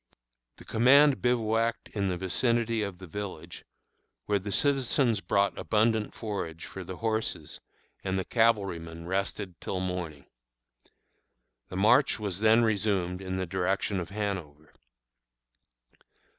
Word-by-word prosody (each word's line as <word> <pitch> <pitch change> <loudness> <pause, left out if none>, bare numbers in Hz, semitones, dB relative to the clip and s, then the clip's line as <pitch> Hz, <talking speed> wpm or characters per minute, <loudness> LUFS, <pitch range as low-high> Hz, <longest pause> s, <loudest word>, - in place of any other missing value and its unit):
The - - -15
command 135 +5 +5
bivouacked 115 -1 0
in 100 -2 -1
the 90 -1 -1
vicinity 115 +5 +1
of 100 -3 -4
the 95 - -10
village, 95 -1 -7 0.6
where 105 -1 +1
the 100 +2 -6
citizens 130 -1 +2
brought 100 0 +1
abundant 110 0 +1
forage 90 -7 -5
for 95 - -8
the 90 0 -7
horses, 110 -8 -2 0.4
and 95 0 -1
the 95 - -2
cavalrymen 95 -8 0
rested 95 0 -3
till 95 - -3
morning. 90 -6 -4 1.4
The 95 - -5
march 120 +7 +4
was 100 -4 -2
then 110 +2 +5
resumed 100 -4 0
in 95 -1 -3
the 95 - -1
direction 95 +2 -1
of 85 -1 -5
Hanover. 95 -8 -5
100 Hz, 125 wpm, -28 LUFS, 90-110 Hz, 1.4 s, command